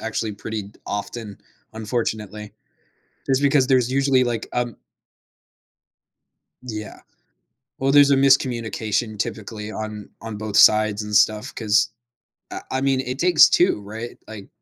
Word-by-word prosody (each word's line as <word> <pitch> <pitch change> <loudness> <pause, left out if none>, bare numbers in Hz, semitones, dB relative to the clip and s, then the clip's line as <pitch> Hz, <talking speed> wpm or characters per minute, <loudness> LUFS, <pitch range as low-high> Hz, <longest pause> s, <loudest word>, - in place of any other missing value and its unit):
actually 110 -1 -3
pretty 105 +1 -5
d 100 - -16
often, 105 0 -5 0.3
unfortunately. 110 -2 -4 0.7
It's 135 0 +1
because 140 -2 +3
there's 125 -2 +2
usually, 135 -1 +2
like, 120 -3 -2
um 120 -2 -2 1.9
Yeah. 110 -4 -7 0.8
Well, 135 +1 +1
there's 145 0 +6
a 140 - +5
miscommunication 120 -5 +1
typically 110 -1 -5
on 110 -1 -7
on 110 -2 -7
both 105 -1 -3
sides 110 -1 +5
and 105 0 -4
stuff, 105 +1 +2
'cause 110 0 +2 0.6
I - - -6
I 130 - -1
mean, 135 -1 +1
it 130 +1 -5
takes 175 -3 +6
two, 175 - +2
right, 110 +4 -8
like 105 -3 -10
110 Hz, 130 wpm, -22 LUFS, 105-130 Hz, 1.9 s, there's